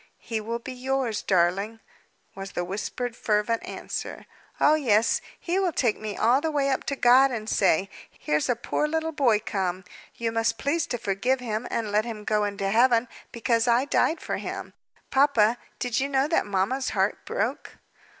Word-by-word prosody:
"He 225 Hz, -2 st, -4 dB
will 230 Hz, +2 st, -3 dB
be 245 Hz, +2 st, -8 dB
yours, 255 Hz, -3 st, -1 dB
darling," 195 Hz, +5 st, +1 dB, 0.5 s
was 195 Hz, 0 st, -8 dB
the 175 Hz, -, -2 dB
whispered, 225 Hz, +6 st, -4 dB
fervent 215 Hz, +1 st, 0 dB
answer. -, -, -6 dB, 0.3 s
"Oh, 300 Hz, -, +5 dB
yes. 230 Hz, -7 st, +2 dB, 0.2 s
He 360 Hz, +2 st, -1 dB
will 375 Hz, -3 st, +1 dB
take 240 Hz, -8 st, 0 dB
me 215 Hz, -2 st, -5 dB
all 250 Hz, +4 st, +3 dB
the 320 Hz, -, 0 dB
way 280 Hz, -2 st, +1 dB
up 265 Hz, -, -1 dB
to 280 Hz, -, -1 dB
God, 255 Hz, +2 st, +6 dB
and 220 Hz, -4 st, -5 dB
say, 190 Hz, -3 st, +2 dB, 0.2 s
'Here's 150 Hz, +7 st, -1 dB
a 245 Hz, -, +3 dB
poor 270 Hz, +5 st, -1 dB
little 320 Hz, +1 st, -1 dB
boy 260 Hz, -8 st, +3 dB
come, 185 Hz, -2 st, -2 dB, 0.3 s
you 230 Hz, -1 st, -2 dB
must 225 Hz, 0 st, 0 dB
please 305 Hz, +3 st, 0 dB
to 245 Hz, -, -2 dB
forgive 235 Hz, +6 st, 0 dB
him 230 Hz, -1 st, -3 dB
and 220 Hz, -3 st, -2 dB
let 210 Hz, +2 st, +2 dB
him 220 Hz, -3 st, -6 dB
go 210 Hz, 0 st, +1 dB
into 200 Hz, -1 st, -2 dB
Heaven, 240 Hz, +1 st, +4 dB, 0.2 s
because 230 Hz, 0 st, +1 dB
I 240 Hz, +3 st, +3 dB
died 320 Hz, +3 st, +1 dB
for -, -, -3 dB
him!' -, -, -6 dB, 0.4 s
Papa 245 Hz, -5 st, +3 dB, 0.2 s
did 245 Hz, -2 st, -1 dB
you 275 Hz, +1 st, -1 dB
know 270 Hz, 0 st, +2 dB
that 325 Hz, -8 st, +1 dB
mamma's 205 Hz, +7 st, 0 dB
heart -, -, +1 dB
broke?" -, -, -3 dB
235 Hz, 180 wpm, -26 LUFS, 210-265 Hz, 0.5 s, God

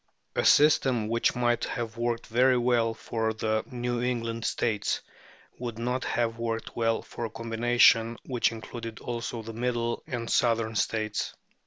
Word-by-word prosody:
A -, -, +1 dB
system 130 Hz, -7 st, +4 dB
which 115 Hz, +1 st, +1 dB
might 120 Hz, -1 st, +1 dB
have 115 Hz, -1 st, -4 dB
worked 120 Hz, 0 st, -1 dB
very 125 Hz, +2 st, +3 dB
well 120 Hz, -2 st, +2 dB
for 110 Hz, -1 st, -2 dB
the 110 Hz, 0 st, 0 dB
New 120 Hz, -1 st, -2 dB
England 115 Hz, -2 st, -2 dB
States 105 Hz, -4 st, 0 dB, 0.6 s
would 120 Hz, -2 st, -5 dB
not 125 Hz, +2 st, -1 dB
have 115 Hz, -1 st, -1 dB
worked 115 Hz, -1 st, -3 dB
well 115 Hz, -1 st, +1 dB
for -, -, -7 dB
a -, -, -4 dB
combination 115 Hz, 0 st, +3 dB
which 125 Hz, -3 st, +1 dB
included 115 Hz, 0 st, -7 dB
also 115 Hz, -1 st, -4 dB
the 115 Hz, +1 st, -7 dB
middle 120 Hz, 0 st, -1 dB
and 120 Hz, -5 st, -4 dB
southern 115 Hz, -2 st, +2 dB
States. 110 Hz, +1 st, -1 dB
115 Hz, 150 wpm, -28 LUFS, 115-120 Hz, 0.6 s, system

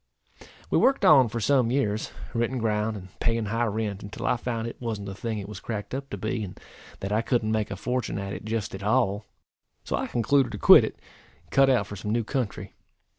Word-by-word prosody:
We -, -, +4 dB
worked 270 Hz, +1 st, +3 dB
on 135 Hz, -6 st, +7 dB
for 115 Hz, -, -3 dB
some 130 Hz, 0 st, +3 dB
years, 115 Hz, -5 st, 0 dB, 0.2 s
renting 120 Hz, +2 st, 0 dB
ground, 110 Hz, -1 st, 0 dB
and 95 Hz, -1 st, -10 dB
paying 115 Hz, -1 st, 0 dB
high 115 Hz, +3 st, 0 dB
rent, 105 Hz, -2 st, -2 dB
until 100 Hz, -, -7 dB
I -, -, +3 dB
found 115 Hz, -2 st, -3 dB
it 115 Hz, -, -9 dB
wan't 110 Hz, -4 st, -3 dB
the 100 Hz, -, -5 dB
thing 110 Hz, +2 st, -4 dB
it 100 Hz, -1 st, -5 dB
was 105 Hz, -2 st, -8 dB
cracked 105 Hz, +1 st, -5 dB
up 135 Hz, +1 st, -4 dB
to 100 Hz, -, -5 dB
be; 110 Hz, +3 st, -2 dB
and 95 Hz, -2 st, -8 dB, 0.4 s
that 100 Hz, -, -3 dB
I 110 Hz, +2 st, +2 dB
couldn't 115 Hz, -3 st, 0 dB
make 110 Hz, -1 st, 0 dB
a -, -, -4 dB
fortune 125 Hz, +3 st, -2 dB
at 100 Hz, 0 st, -4 dB
it -, -, -7 dB
just 110 Hz, -1 st, -3 dB
at 95 Hz, -, -6 dB
all. 100 Hz, 0 st, +1 dB, 0.6 s
So -, -, -2 dB
I -, -, -2 dB
concluded 120 Hz, +1 st, +2 dB
to -, -, -4 dB
quit -, -, +8 dB
it, -, -, -7 dB, 0.5 s
and -, -, -29 dB
cut 135 Hz, 0 st, +5 dB
out 130 Hz, -2 st, +3 dB
for 100 Hz, -, -8 dB
some 100 Hz, +2 st, -5 dB
new 115 Hz, +1 st, +1 dB
country. 125 Hz, -2 st, -3 dB
110 Hz, 230 wpm, -26 LUFS, 105-120 Hz, 0.6 s, quit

